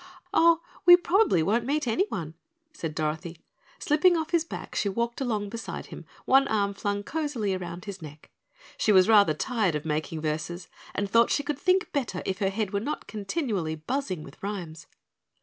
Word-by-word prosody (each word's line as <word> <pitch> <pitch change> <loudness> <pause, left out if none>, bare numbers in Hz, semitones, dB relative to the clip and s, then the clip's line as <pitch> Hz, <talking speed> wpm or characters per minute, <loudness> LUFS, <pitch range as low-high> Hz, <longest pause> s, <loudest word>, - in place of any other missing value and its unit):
"Oh, 335 0 +5 0.2
we 350 0 +9
probably 360 - +3
won't 225 +7 +1
meet 285 +2 -1
anyone," 220 - -1 0.4
said 165 - -5
Dorothy. 160 +2 -3 0.4
Slipping 335 +4 +3
off 320 0 -3
his 340 -2 +3
back, 335 - -8
she 200 - 0
walked 235 +5 -2
along 215 -5 -1
beside 225 +1 -6
him, - - -10 0.2
one 270 +1 +5
arm 200 -3 0
flung 205 0 -2
cozily 275 -9 -2
around 180 0 -6
his 200 -3 -7
neck. 150 -1 -12 0.5
She 215 - +2
was 185 -2 +6
rather 205 -8 +5
tired 215 -3 0
of 150 - -4
making 155 +1 -2
verses 160 +3 -3 0.3
and 205 - -1
thought 230 +3 +4
she 285 - +1
could 290 -1 -3
think 370 +4 +2
better 240 - -2
if 190 0 -2
her 195 - +1
head 205 0 -2
were 200 - +1
not 290 +9 -4
continually 205 - -2
buzzing 185 - -3
with 140 - -14
rhymes. 175 -5 -6
205 Hz, 180 wpm, -27 LUFS, 175-275 Hz, 0.5 s, we